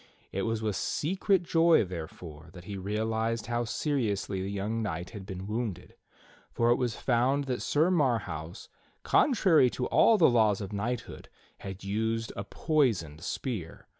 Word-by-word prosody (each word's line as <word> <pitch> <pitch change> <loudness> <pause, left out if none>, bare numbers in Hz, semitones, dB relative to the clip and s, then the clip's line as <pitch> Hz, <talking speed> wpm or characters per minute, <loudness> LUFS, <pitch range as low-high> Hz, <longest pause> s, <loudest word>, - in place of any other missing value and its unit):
It 95 +3 -2
was 115 -1 -2
with 105 -3 -1
secret 185 - 0
joy, 165 -3 +4
therefore, 80 -2 -8
that 90 -2 -11
he 100 +2 -6
realized 110 +3 -1
how 120 0 -1
seriously 115 -6 -1
the 95 - -3
young 105 +3 -2
knight 90 -4 -4
had 100 -4 -9
been 95 -1 -6
wounded; 110 -3 -4 0.6
for 120 0 +2
it 120 - +4
was 120 -4 -1
found 130 +3 +1
that 130 -3 -3
Sir 160 +5 +2
Marhaus, 110 - -1 0.4
contrary 185 - +4
to 125 - -3
all 225 - +5
the 170 - +6
laws 110 -5 +3
of 100 -1 -6
knighthood, 115 +4 -4 0.3
had 95 -1 -8
used 110 +3 -2
a 100 - -4
poisoned 105 - 0
spear. 95 - -5
110 Hz, 155 wpm, -29 LUFS, 95-125 Hz, 0.6 s, the